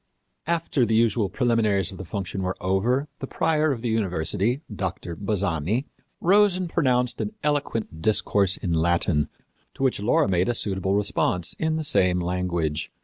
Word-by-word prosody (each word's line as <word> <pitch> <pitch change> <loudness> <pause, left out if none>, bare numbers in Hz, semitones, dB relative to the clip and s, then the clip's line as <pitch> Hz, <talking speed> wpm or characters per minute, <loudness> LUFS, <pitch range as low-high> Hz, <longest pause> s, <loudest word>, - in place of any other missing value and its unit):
After 165 -5 +1
the 110 -1 +1
usual 110 -2 +2
preliminaries 110 -3 +1
of 95 - -10
the 95 - -6
function 95 0 -4
were 90 0 -2
over 120 +10 +1
the 135 - -5
prior 155 0 +1
of 120 -4 -3
the 120 - -1
university, 100 - 0
Doctor 95 -3 -4
Bazzani, 100 - -1 0.3
rose 200 +1 +4
and 185 -1 -2
pronounced 125 -7 +1
an 210 +1 -4
eloquent 125 - -2
discourse 100 0 +2
in 90 -4 -2
Latin 80 -2 +2 0.5
to - - -4
which 130 -5 +1
Laura 105 +2 +2
made 90 +1 +1
a 120 - +1
suitable 95 -3 0
response 90 -4 0
in 160 0 0
the 160 - -2
same 90 -9 +2
language. 85 -4 -2
100 Hz, 160 wpm, -24 LUFS, 90-125 Hz, 0.5 s, rose